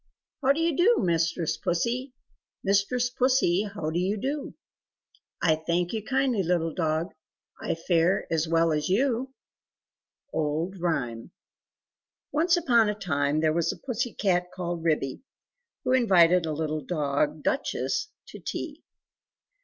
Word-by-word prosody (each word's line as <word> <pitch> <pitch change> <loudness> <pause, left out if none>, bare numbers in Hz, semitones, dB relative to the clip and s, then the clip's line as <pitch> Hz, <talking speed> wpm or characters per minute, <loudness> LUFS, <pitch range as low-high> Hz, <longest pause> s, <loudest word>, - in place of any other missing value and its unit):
How 270 0 +4
do 285 - 0
you 330 -2 +1
do 430 - +4
mistress 165 -1 0
Pussy? 245 +9 -1 0.5
Mistress 205 +5 +1
Pussy, 245 -7 +2
how 165 -6 -3
do 170 - 0
you 195 +4 0
do?" 275 +6 -3 0.9
"I 160 -3 +4
thank 170 +4 -1
you 220 -2 -2
kindly, 265 -3 +1
little 165 -2 0
dog, 160 +1 -1 0.5
I - - -1
fare 170 +2 +1
as 160 0 +1
well 165 0 +3
as 150 +1 -1
you!" 255 +5 +1 1.0
Old 160 +5 -1
Rhyme. 125 -9 -2 1.0
ONCE 340 +4 +3
upon 235 -10 +3
a 210 - -1
time 150 -6 0
there 155 -1 +2
was 170 0 +1
a - - -8
Pussy 245 -2 -3
cat 180 -3 +1
called 175 -2 -4
Ribby, 150 -5 0 0.6
who - - 0
invited 180 -9 +5
a - - -1
little 155 0 -2
dog 145 -1 0
called 155 -2 -15
Duchess 135 - -1 0.2
to - - -10
tea. - - -6
180 Hz, 140 wpm, -27 LUFS, 160-240 Hz, 1.0 s, invited